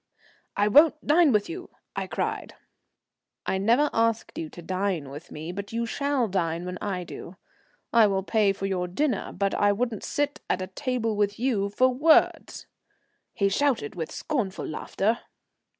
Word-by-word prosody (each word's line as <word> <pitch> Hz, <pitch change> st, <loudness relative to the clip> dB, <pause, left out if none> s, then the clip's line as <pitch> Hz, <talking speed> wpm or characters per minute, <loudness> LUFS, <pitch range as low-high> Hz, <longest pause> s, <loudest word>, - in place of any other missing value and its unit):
"I 205 Hz, +1 st, +3 dB
won't 300 Hz, +7 st, +5 dB
dine 310 Hz, 0 st, +5 dB
with 210 Hz, -3 st, +2 dB
you," 355 Hz, +2 st, -7 dB, 0.3 s
I -, -, -2 dB
cried. -, -, -3 dB, 0.9 s
"I 190 Hz, -, 0 dB
never 235 Hz, +9 st, +3 dB
asked 230 Hz, 0 st, 0 dB
you 160 Hz, -, -4 dB
to 175 Hz, -, -11 dB
dine 185 Hz, -5 st, -2 dB
with 150 Hz, +5 st, -10 dB
me, 155 Hz, +3 st, -6 dB
but 200 Hz, +2 st, -6 dB
you 235 Hz, 0 st, 0 dB
shall 280 Hz, 0 st, 0 dB
dine 170 Hz, -3 st, -1 dB
when 180 Hz, 0 st, -5 dB
I 190 Hz, -3 st, -3 dB
do. 175 Hz, +1 st, -9 dB, 0.6 s
I 230 Hz, -2 st, +7 dB
will 195 Hz, -1 st, 0 dB
pay 210 Hz, 0 st, +2 dB
for 195 Hz, 0 st, -4 dB
your 185 Hz, -2 st, -1 dB
dinner, 250 Hz, +4 st, -1 dB
but 195 Hz, +1 st, -1 dB
I 205 Hz, 0 st, +3 dB
wouldn't 225 Hz, 0 st, -2 dB
sit 290 Hz, 0 st, -2 dB
at 185 Hz, 0 st, -2 dB
table 250 Hz, -5 st, -1 dB
with 205 Hz, 0 st, 0 dB
you 225 Hz, -5 st, 0 dB
for 255 Hz, +5 st, +3 dB
worlds," 295 Hz, +6 st, +3 dB, 0.7 s
he 200 Hz, -4 st, +2 dB
shouted 225 Hz, -, +1 dB
with 165 Hz, -3 st, -5 dB
scornful 235 Hz, -11 st, -2 dB
laughter. 205 Hz, +8 st, -1 dB
205 Hz, 165 wpm, -26 LUFS, 190-250 Hz, 0.9 s, I